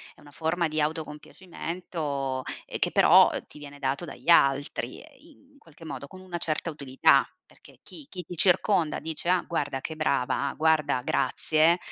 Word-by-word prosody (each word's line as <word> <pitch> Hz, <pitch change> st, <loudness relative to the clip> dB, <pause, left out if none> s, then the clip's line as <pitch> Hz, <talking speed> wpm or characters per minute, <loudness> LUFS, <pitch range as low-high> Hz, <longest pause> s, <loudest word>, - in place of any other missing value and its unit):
è -, -, -24 dB
una 145 Hz, -, -16 dB
forma 165 Hz, +2 st, -1 dB
di 155 Hz, 0 st, -1 dB
autocompiacimento, 155 Hz, -2 st, -4 dB, 0.2 s
ehm, -, -, -6 dB
che, -, -, +1 dB
però, -, -, +6 dB, 0.2 s
ti 150 Hz, -, -14 dB
viene 145 Hz, -1 st, -10 dB
dato 140 Hz, +3 st, -2 dB
dagli -, -, -10 dB
altri, 140 Hz, -3 st, +2 dB
uhm, 290 Hz, -4 st, -21 dB
in -, -, -22 dB
qualche 165 Hz, -, -16 dB
modo 140 Hz, -2 st, -7 dB
con 185 Hz, +3 st, -13 dB
una 180 Hz, -2 st, -6 dB
certa 160 Hz, +1 st, -1 dB
utilità. 140 Hz, -3 st, +3 dB, 0.2 s
Perché -, -, -20 dB
chi 295 Hz, -3 st, -12 dB
chi 180 Hz, -2 st, -7 dB
ti 175 Hz, -, -9 dB
circonda 180 Hz, -2 st, +2 dB
dice: 160 Hz, +2 st, -3 dB
"Ah 180 Hz, -1 st, +3 dB
guarda 145 Hz, -5 st, -2 dB
che 160 Hz, +3 st, -6 dB
brava, 140 Hz, -2 st, 0 dB
guarda 155 Hz, -4 st, +2 dB
grazie, 160 Hz, +5 st, +2 dB
155 Hz, 165 wpm, -27 LUFS, 145-175 Hz, 0.2 s, però